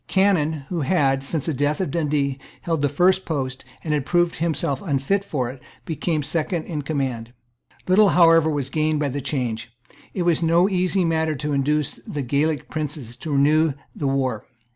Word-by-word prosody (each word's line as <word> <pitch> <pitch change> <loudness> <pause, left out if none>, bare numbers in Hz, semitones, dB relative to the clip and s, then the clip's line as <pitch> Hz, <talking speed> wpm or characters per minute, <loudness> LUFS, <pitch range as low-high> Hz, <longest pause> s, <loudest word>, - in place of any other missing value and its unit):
Cannon, 160 -7 +1
who 175 -3 -2
had, 135 -3 +2
since 145 +1 -2
the 160 - 0
death 145 +2 0
of 185 -7 -1
Dundee, 145 -4 0 0.2
held 165 -3 -1
the 145 - +2
first 185 +5 +3
post 135 -4 -3 0.2
and 155 - -1
had 145 -2 0
proved 175 +3 +1
himself 160 -4 0
unfit 155 +5 0
for 130 -10 -2
it, 130 -1 -13 0.2
became 160 -1 -1
second 160 +2 -1
in 155 -3 -4
command. 130 -6 -3 0.5
Little 200 +2 +5
however 165 -3 +5
was 140 -3 -2
gained 155 -1 +1
by 145 -1 0
the 140 +2 -3
change. 120 -5 -3 0.4
It 185 - 0
was 170 -2 +2
no 170 +2 +4
easy 185 -1 +1
matter 160 -1 0
to 150 +2 -3
induce 145 +1 0
the 145 -2 -5
Gaelic 145 +4 0
princes 145 -6 -4
to 155 -3 -4
renew 150 +2 +3 0.2
the 145 - -2
war. 130 -5 -1
150 Hz, 180 wpm, -22 LUFS, 140-165 Hz, 0.5 s, Little